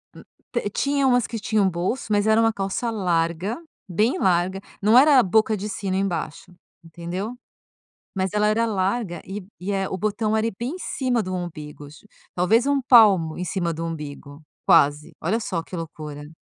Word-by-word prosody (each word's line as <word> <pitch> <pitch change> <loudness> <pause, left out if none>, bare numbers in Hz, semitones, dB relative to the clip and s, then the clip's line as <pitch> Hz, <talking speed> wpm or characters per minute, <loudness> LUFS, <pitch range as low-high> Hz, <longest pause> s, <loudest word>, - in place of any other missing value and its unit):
Hum. - - -11 0.3
T 235 -4 -1
tinha 280 +4 0
umas 245 -2 +3
que 225 -1 -5
tinham 210 -3 +1
bolso, 180 +9 -3
mas 205 +1 +2
era 220 +1 +4
uma 225 0 +3
calça 195 +4 -2
larga, 175 - -1 0.3
bem 215 - +1
larga, 185 +1 +1 0.2
não 215 +4 +5
era 285 0 +7
a - - +5
boca 215 +3 +2
de 210 +2 -5
sino 190 -2 -3
embaixo, 175 -4 -3 0.3
entendeu, 175 +7 -6 0.8
mas 190 -1 -1
ela 210 0 +2
era 225 +2 +2
larga 195 -2 -1
e 195 0 -7
e, 190 +3 -4
eh, 195 -1 -1
o 190 - -3
botão 215 +2 -1
era 220 +1 +1
bem 245 +4 -2
em - - -9
cima 255 - -1
do 185 0 -5
umbigo 155 -5 -6
tip 210 +8 -17 0.3
Talvez 220 +8 +3
um 280 -1 +2
palmo 205 -10 +5
em 180 - -3
cima 175 -3 -2
do 165 +1 -4
umbigo, 150 -2 -7 0.2
quase, 145 +1 +3
olha 210 +8 0
só 175 -7 -3
que 180 - -9
loucura. 155 -2 -7
195 Hz, 180 wpm, -23 LUFS, 170-225 Hz, 0.8 s, era